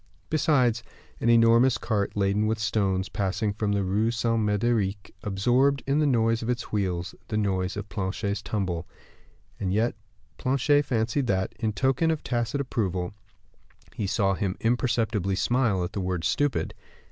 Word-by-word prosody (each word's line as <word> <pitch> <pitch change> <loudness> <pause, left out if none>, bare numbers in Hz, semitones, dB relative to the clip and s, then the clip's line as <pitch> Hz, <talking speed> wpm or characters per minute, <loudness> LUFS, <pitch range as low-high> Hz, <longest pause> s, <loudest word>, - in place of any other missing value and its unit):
Besides, 135 -7 +2 0.4
an 115 - +1
enormous 115 +2 +5
cart, 105 -3 -2
laden 100 +2 +2
with 110 0 0
stones, 100 -3 0
passing 100 0 -1
from 105 0 -1
the 100 -1 +1
Rue 105 +4 +1
Saint 115 0 0
Mederic, 105 -1 0
absorbed, 125 +8 +2
in 140 +2 +1
the 150 - +3
noise 115 -3 +2
of 115 - -4
its 120 -1 -2
wheels, 95 -3 -1
the 105 - -2
noise 95 -2 0
of 105 0 -5
Planchet's 100 0 -3
tumble. 90 -6 -3 0.7
And 95 -2 -1
yet 110 +5 +1 0.5
Planchet 140 +3 +2
fancied 120 +2 0
that, 95 -2 0
in 110 -2 -1
token 135 - +1
of 160 -2 -1
tacit 120 +3 -1
approval, 95 -9 -2 0.8
he 105 - -3
saw 95 0 +1
him 95 -1 -2
imperceptibly 115 -5 +1
smile 115 -4 +1
at 90 - -5
the 100 - -2
word 90 -2 -2
"stupid." 145 +5 0
110 Hz, 155 wpm, -26 LUFS, 100-120 Hz, 0.8 s, enormous